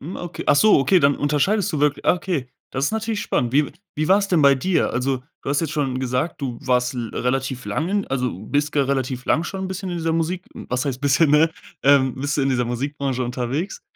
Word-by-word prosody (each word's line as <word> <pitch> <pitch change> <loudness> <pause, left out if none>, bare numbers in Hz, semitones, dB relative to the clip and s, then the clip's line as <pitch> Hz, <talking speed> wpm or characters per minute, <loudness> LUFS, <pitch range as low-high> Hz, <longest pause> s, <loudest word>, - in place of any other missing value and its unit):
hm, 165 +7 -7
okay. 175 -1 -6
Ach - - +5
so, 215 +7 +6
okay, 180 +7 +4
dann 140 -2 +3
unterscheidest 185 +8 +1
du 150 - -1
wirklich. 145 -1 +1
Ah, - - +5
okay, 170 -8 -3 0.3
ist 135 +6 0
natürlich 220 -1 -2
spannend. 120 -1 -1
Wie 145 +1 +2 0.2
wie 155 +2 -1
war's 200 +1 +4
denn 175 -4 +3
bei 140 -1 +7
dir? 175 +7 +1
Also, 130 +2 0 0.2
du - - -3
hast 145 - +1
jetzt 155 -3 -2
schon 135 -4 -1
gesagt, 130 +6 -2
du 125 -4 -4
warst 125 0 +1
l 120 -3 -4
relativ 130 0 -2
lang 150 +11 -1
in 200 0 0
also, 125 -2 -1 0.2
bist 145 +1 0
ger 140 -2 +1
relativ 130 -2 -2
lang 160 - +2
schon 190 +1 -4
bisschen 190 0 -5
in 175 - -3
dieser 165 0 -1
Musik. 170 +3 -2
Was 125 +3 -3
heißt 130 -2 -3
bisschen, 145 +2 +3
ne, 155 +2 +5 0.3
ähm, 135 -2 +4
bist 140 +3 -2
du - - +2
in 135 - +1
dieser 125 -2 +1
Musikbranche 130 +1 -2
unterwegs. 125 +9 -3
140 Hz, 230 wpm, -22 LUFS, 130-165 Hz, 0.3 s, bei